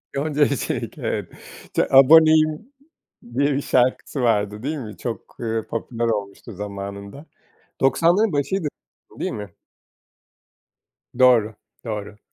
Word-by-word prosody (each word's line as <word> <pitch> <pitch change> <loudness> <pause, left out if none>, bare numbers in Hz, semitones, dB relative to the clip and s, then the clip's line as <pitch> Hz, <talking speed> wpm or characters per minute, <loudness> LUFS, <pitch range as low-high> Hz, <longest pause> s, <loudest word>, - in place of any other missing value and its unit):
Yonca 150 +1 -1
Evcimik 140 -3 0
evet, - - -3 0.4
ç - - +1
Aboneyim 155 - +5 0.7
diye 140 +1 +2
bir 140 - -1
şarkısı 130 +1 0
vardı 105 -2 0
değil 155 +3 -2
mi? 110 -6 -8
Çok, 120 -3 -7
ııı, 115 -2 -3
popüler 115 0 -3
olmuştu 105 +1 -4
zamanında 100 - -7 0.6
90´ların 175 +9 +3
başıydı 155 +4 -1 0.5
değil - - -2
mi? - - -6 1.7
Doğru 115 -4 +4 0.3
doğru. 105 -1 -5
125 Hz, 105 wpm, -22 LUFS, 105-150 Hz, 1.7 s, Aboneyim